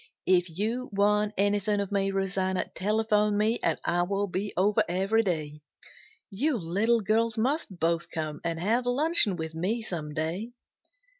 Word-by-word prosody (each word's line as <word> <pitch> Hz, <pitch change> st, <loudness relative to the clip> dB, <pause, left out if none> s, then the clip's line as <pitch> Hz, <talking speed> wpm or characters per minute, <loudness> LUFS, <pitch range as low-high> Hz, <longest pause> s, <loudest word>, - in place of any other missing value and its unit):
If 175 Hz, -3 st, +2 dB
you 235 Hz, +5 st, -2 dB
want 210 Hz, +1 st, +2 dB
anything 205 Hz, +1 st, +1 dB
of 200 Hz, -1 st, -3 dB
me, 195 Hz, -1 st, +1 dB
Rosanna, 190 Hz, -1 st, -1 dB
telephone 210 Hz, 0 st, +1 dB
me 220 Hz, +3 st, +1 dB
and -, -, 0 dB
I 175 Hz, -, +1 dB
will 195 Hz, +3 st, 0 dB
be 200 Hz, +2 st, -3 dB
over 200 Hz, +3 st, +3 dB
every 195 Hz, +5 st, +2 dB
day. 155 Hz, -7 st, -3 dB, 0.7 s
You 265 Hz, +7 st, 0 dB
little 210 Hz, +6 st, +1 dB
girls 225 Hz, +2 st, +1 dB
must 250 Hz, -, -1 dB
both 165 Hz, +1 st, 0 dB
come 155 Hz, -2 st, -4 dB
and 165 Hz, -1 st, -2 dB
have 230 Hz, +7 st, +1 dB
luncheon 270 Hz, -, +3 dB
with 160 Hz, -2 st, -5 dB
me 200 Hz, +8 st, -2 dB
some 155 Hz, -7 st, -5 dB
day." 175 Hz, +10 st, -3 dB
200 Hz, 155 wpm, -28 LUFS, 175-220 Hz, 0.7 s, over